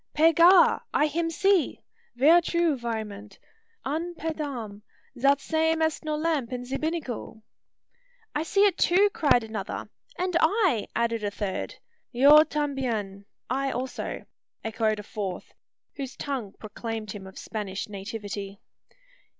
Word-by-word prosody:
"Pe 325 +2 +5
Gar! 345 +3 +6
I 300 - +3
him 330 +2 -1
see. 365 +2 +2 0.4
Ver 310 +8 +6
true, 340 -2 +1
vraiment! 215 -4 -5 0.5
An 330 +5 -3
pe 325 0 -3
dam! 240 -10 -5 0.4
zat 275 +2 +4
same 320 +2 +1
est 315 0 -1
no 305 -1 -1
lamp 300 -6 -1
in 250 0 -4
ze 260 +2 -4
binnacle!" 290 -9 -4 0.9
"I 295 - 0
see 395 +5 +3
it 390 -3 +1
too!" 400 +4 +4
cried 280 - +3
another. 220 -3 -5 0.3
"And 365 -1 -1
I!" 335 - +2
added 230 -1 0
a 205 - 0
third. 200 -1 -4 0.4
"Io 290 +5 +8
tambien!" 240 -11 -2 0.2
(I 270 +2 0
also) 255 -1 -4 0.4
echoed 220 -1 0
a 210 - -7
fourth, 195 -3 -5 0.4
whose 270 -2 -5
tongue 260 -9 -4
proclaimed 220 0 -5
him 195 -2 -8
of 190 - -13
Spanish 200 -3 -5
nativity. 200 -1 -6
265 Hz, 135 wpm, -26 LUFS, 215-320 Hz, 0.9 s, Io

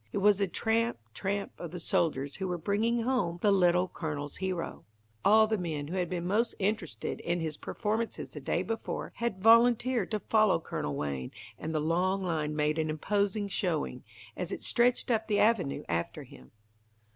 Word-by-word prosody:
It - - -3
was 205 0 +4
the 200 - +2
tramp, 225 +5 0 0.2
tramp 200 - -2
of 175 - -5
the 180 +2 -6
soldiers 145 -4 0
who 190 0 -2
were 180 -1 -2
bringing 220 +7 +1
home 240 -9 0
the 205 - +5
Little 180 -1 +4
Colonel's 150 -4 -5
Hero, 185 -3 -3 0.4
All 220 +2 +6
the 220 -1 0
men 155 -4 -3
who 180 - -4
had 180 -2 0
been 175 -1 -3
most 220 +6 +1
interested 190 - -2
in 175 +1 -1
his 160 -2 -3
performances 220 +6 -3
the 150 - -6
day 170 +6 -1
before, 225 +3 -4
had 230 -5 -2
volunteered 235 0 +5
to 215 - -1
follow 215 -4 +3
Colonel 75 - -4
Wayne, 70 -3 -3 0.3
and 160 - -4
the 155 - 0
long 180 +5 +1
line 155 -4 -1
made 150 +1 +1
an 155 0 0
imposing 200 +6 0
showing, 165 -9 -2 0.3
as 180 +1 -4
it - - -5
stretched 245 +1 +2
up 220 -1 +1
the 210 -2 +1
avenue 210 -10 +2
after 85 0 -2
him. 65 - -15
185 Hz, 180 wpm, -30 LUFS, 160-215 Hz, 0.4 s, All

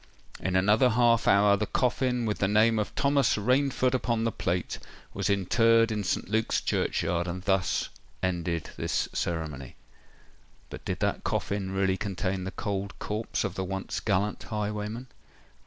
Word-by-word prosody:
In 95 0 -2
another 105 +7 +4
half 115 -1 +3
hour, 100 +1 +5
the 105 +1 -2
coffin, 125 -1 0
with 105 -1 -1
the 95 - +2
name 110 +2 +4
of 105 - -1
"THOMAS 140 -3 +2
RAINFORD" 130 +3 +2
upon 120 -3 0
the 115 - +1
plate, 90 -3 -2 0.3
was - - -1
interred 115 +4 +3
in 105 -1 -1
St. 90 - -1
Luke's 110 +2 +1
churchyard; 85 +1 0
and 90 +1 -5
thus 95 -2 +1 0.3
ended 85 -2 -1
this - - -1
ceremony. 75 -6 -3 1.0
But - - -8
did - - -3
that - - 0
coffin 100 -1 -2
really 95 0 +1
contain 95 -1 -2
the - - -2
cold 100 0 -4
corse 105 +2 -2
of - - -2
the 95 - -3
once 95 +1 -3
gallant 100 0 0
highwayman? 105 +2 -4
105 Hz, 155 wpm, -28 LUFS, 95-115 Hz, 1.0 s, hour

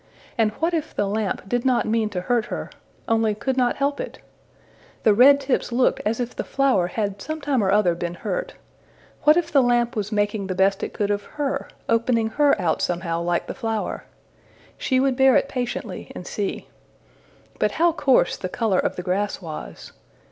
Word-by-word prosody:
And 225 -2 +3
what 330 +7 -1
if 315 -1 -2
the 205 - +1
lamp 200 -1 -2
did 245 +3 0
not 255 -2 +2
mean 220 -1 +1
to 185 -3 -3
hurt 235 +4 +1
her, - - -5 0.4
only 225 -2 +2
could 260 +5 -2
not 250 -2 +2
help 280 +1 -1
it? - - -5 0.9
The 215 - +5
red 275 +6 +7
tips 270 -2 -1
looked 245 +2 +2
as 225 +2 -1
if 245 0 -3
the - - -3
flower 265 -10 +2
had 200 +1 -3
some 310 +6 -4
time 280 -6 0
or 190 - +1
other 195 -3 +3
been 170 0 -4
hurt: - - -4 0.7
what 300 +2 +7
if 340 -1 0
the 280 -4 +5
lamp 240 -1 +2
was 210 0 -3
making 205 -1 0
the 185 - -3
best 195 +1 +2
it - - -4
could 205 -1 0
of 205 0 0 0.2
her 285 -2 -2 0.2
opening 230 -1 +2
her 290 -1 +3
out 175 -4 0
somehow 170 -1 -1
like 175 0 0
the - - -5
flower? 225 -4 -3 0.7
She 260 - 0
would 265 -1 +2
bear 265 -1 +5
it - - +3
patiently, 250 -3 -4
and - - -7
see. - - -4 0.9
But - - +1
how 340 +1 +3
coarse 280 -5 +2
the 185 - -5
color 205 -1 +1
of - - -1
the 180 - -5
grass 195 +3 -1
was! 160 -4 -8
225 Hz, 195 wpm, -23 LUFS, 200-265 Hz, 0.9 s, red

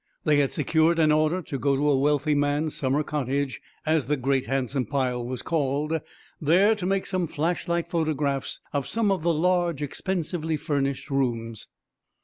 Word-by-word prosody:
They 150 -1 +3
had 140 -2 +2
secured 160 +3 +2
an 155 -2 +4
order 155 +4 +2
to 140 -3 -5
go 140 +2 +2
to 145 +2 +1
a - - +4
wealthy 145 +2 +2
man's 145 +2 +1
summer 140 +2 0
"cottage," 140 -2 -2 0.2
as 155 -5 +1
the 150 +1 +1
great, 135 0 0
handsome 135 -2 -1
pile 125 -2 -1
was 125 0 -5
called, 150 0 0 0.4
there 180 +8 +5
to 195 -4 -3
make 195 0 0
some 185 -3 -1
flashlight 170 +2 -1
photographs 150 -5 -1
of 140 -2 -1
some 220 -3 +1
of 190 -4 0
the 170 +1 +2
large, 175 -1 +1
expensively 160 0 -2
furnished 140 -2 -2
rooms. 115 -5 -2
150 Hz, 165 wpm, -26 LUFS, 135-165 Hz, 0.4 s, there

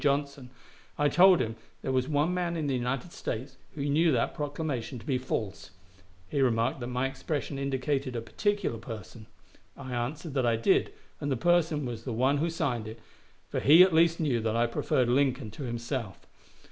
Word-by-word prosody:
Johnson, 140 -2 -1 0.5
I 145 0 +3
told 185 +2 +6
him 110 -2 -3 0.3
there - - -1
was 130 0 +1
one 150 +3 +1
man 175 -2 -1
in 155 - -2
the 140 - 0
United 130 +6 -2
States 130 +4 -5 0.2
who 140 -2 -3
knew 160 +3 +3
that 115 - +1
proclamation 145 -4 -3
to 115 - -12
be 135 -4 0
false. 105 -7 -4 0.6
He 140 +9 -1
remarked 115 -1 +1
that 120 - -4
my 125 +1 -1
expression 135 +1 -3
indicated 135 -1 -1
a 115 - -2
particular 205 - -1
person. 110 -1 -9 0.5
I 130 - -7
answered 140 +6 -3
that 135 -2 +1
I 115 - +3
did, 115 - +2 0.3
and 145 - -2
the 130 - +1
person 165 -1 +2
was 115 -2 -5
the 125 - -4
one 130 +5 +2
who 165 +4 0
signed 125 -9 -2
it, 110 +1 -8 0.5
for - - -2
he 160 +6 +8
at 185 -2 +3
least 165 +1 +4
knew 140 -7 +1
that 110 0 -1
I 120 +1 +3
preferred 120 +1 0
Lincoln 130 -2 +1
to 135 +5 -7
himself. 120 -3 -4
135 Hz, 190 wpm, -29 LUFS, 120-150 Hz, 0.6 s, he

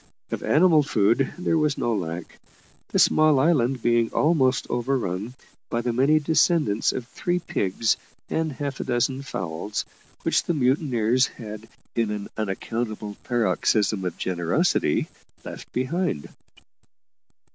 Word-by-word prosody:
Of - - -3
animal 160 0 +5
food 120 -1 +2
there 170 -2 +1
was 150 -2 +1
no 120 - 0
lack, 85 -4 -5 0.5
the - - -2
small 155 -2 +5
island 130 -5 +2
being 120 -1 +2
almost 135 -5 +2
overrun 120 -3 -2 0.3
by 115 - -1
the 120 0 -1
many 135 +6 +4
descendants 155 - +2
of 125 -2 -5
three 175 +7 -1
pigs 110 - 0 0.3
and 160 -1 -1
half 140 0 -4
a - - -2
dozen 125 +2 0
fowls, 95 -4 -4 0.4
which - - +2
the 170 - 0
mutineers 130 -3 +2
had, 110 -1 -9 0.2
in 115 -2 0
an 105 -1 -4
unaccountable 110 +1 -3
paroxysm 110 -4 +1
of 90 -2 -3
generosity, 85 -2 +1 0.4
left - - -9
behind. 130 - -2
120 Hz, 125 wpm, -24 LUFS, 105-145 Hz, 0.5 s, animal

